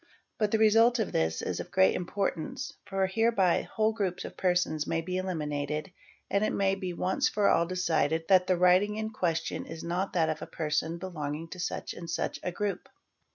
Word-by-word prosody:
But 215 -2 +2
the 220 - +2
result 225 +3 +5
of 220 -4 -1
this 80 0 0
is - - -2
of - - -6
great 95 - +4
importance, 185 +4 -3
for 195 -1 0
hereby 195 -2 +2
whole 220 0 0
groups 195 -5 -2
of - - -8
persons 180 -4 +1
may 165 - 0
be 180 +3 -3
eliminated 150 -2 -3 0.4
and 200 +1 +1
_ - - +3
it - - 0
may 195 -1 +2
be 190 -2 -3
once 180 +2 0
for 205 -1 +2
all 170 - +3
decided 165 -3 0
that 185 -1 +5
the 185 - +2
writing 180 +4 +4
in 220 0 -3
question 170 -6 -2
is 165 - -7
not 180 +3 -2
that 165 -3 +2
of 155 -1 -3
a - - -6
person 160 +1 -1
belonging 165 -3 -5
to 185 - -8
such 175 - -3
and 170 -1 -8
such - - -2
a 180 - -3
group. 195 0 -3
180 Hz, 200 wpm, -29 LUFS, 165-200 Hz, 0.4 s, result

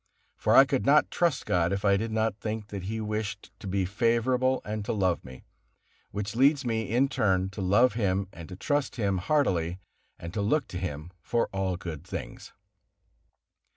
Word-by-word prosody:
For - - +2
I 135 - +9
could 135 -1 0
not 145 +3 +4
trust 170 -6 +1
God, 85 0 +1
if 100 +1 -2
I 100 -1 +5
did 110 +3 -2
not 110 -1 0
think 105 0 -5
that 100 -3 -6
He 110 +3 -3
wished 105 -1 -4
to 100 - -8
be 95 0 0
favorable 120 +5 +1
and 105 0 -3
to - - -1
love 95 -5 0
me, 65 0 -12 0.7
which 105 +2 -4
leads 140 +2 +4
me, 110 -3 -1
in 125 +5 +3
turn, 95 -7 +1
to 95 - -6
love 105 +6 +4
Him 100 -3 0
and 85 -1 -10
to 90 - -7
trust 145 +7 -1
Him 100 -6 0
heartily 90 - +1 0.4
and 85 +1 -8
to 105 - -1
look 130 +7 +1
to 90 - -5
Him 85 -2 -5
for 115 +7 0
all 95 -2 -1
good 80 -4 -7
things. - - -7
105 Hz, 190 wpm, -28 LUFS, 95-120 Hz, 0.7 s, I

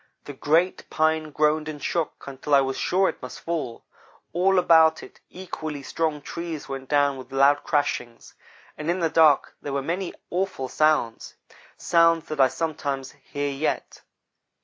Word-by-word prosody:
The 145 - -7
great 165 +7 +1
pine 155 0 +1
groaned 150 +1 +1
and 150 -1 -6
shook 165 +3 -2
until 140 +1 0
I 140 - +6
was 135 0 -2
sure 190 +2 +2
it - - -4
must 130 - -8
fall. 155 -9 -4 0.5
All 185 +3 +3
about 160 -3 +5
it, - - -14
equally 155 -6 -6
strong 150 +2 -2
trees 170 -2 -6
went 135 -1 -6
down 145 -2 +2
with 130 - -11
loud 140 +2 +4
crashings, 125 -6 -2 0.5
and 155 +2 -3
in 175 +2 +1
the 165 -2 0
dark 155 -4 +4
there 145 - -5
were 140 -1 -1
many 175 +4 -3 0.2
awful 180 -8 -2
sounds 155 -7 +1 0.4
sounds 165 -1 +3
that 155 -2 0
I 135 - +7
sometimes 140 -3 -3
hear 145 0 -4
yet. 140 +3 -3
155 Hz, 160 wpm, -25 LUFS, 140-165 Hz, 0.5 s, I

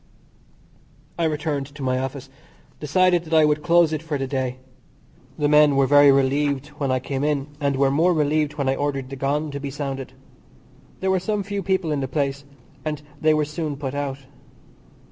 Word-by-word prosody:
I 165 - +2
returned 150 -3 -2
to 140 0 -10
my 130 0 0
office, 135 0 -5 0.5
decided 175 +3 +2
that 160 0 -1
I 155 -1 +6
would 150 0 +1
close 170 -1 +4
it 155 - -2
for 160 -3 -3
the 135 - -2
day. 130 -2 -2 0.8
The 145 - +1
men 150 -1 +5
were 135 0 +4
very 145 +1 +7
relieved 140 +1 +1
when 140 -2 -1
I 130 - +2
came 135 +2 -3
in, 145 -2 0
and 140 -2 0
were 135 0 +2
more 165 +6 +3
relieved 150 -2 +1
when 140 -3 -2
I 135 - +2
ordered 135 -2 -3
the - - -4
gong 145 +3 -1
to 140 - -5
be 140 0 -5
sounded. 135 -2 -5 0.9
There 190 0 +1
were 190 - +2
some 205 +2 -2
few 200 +1 -3
people 190 -3 0
in 150 - 0
the 135 - -2
place, 140 0 -2 0.4
and 150 -1 -3 0.2
they 155 0 +4
were 155 -1 +1
soon 150 -1 -4
put 135 -2 -4
out. 140 -1 -3
145 Hz, 195 wpm, -23 LUFS, 135-155 Hz, 0.9 s, very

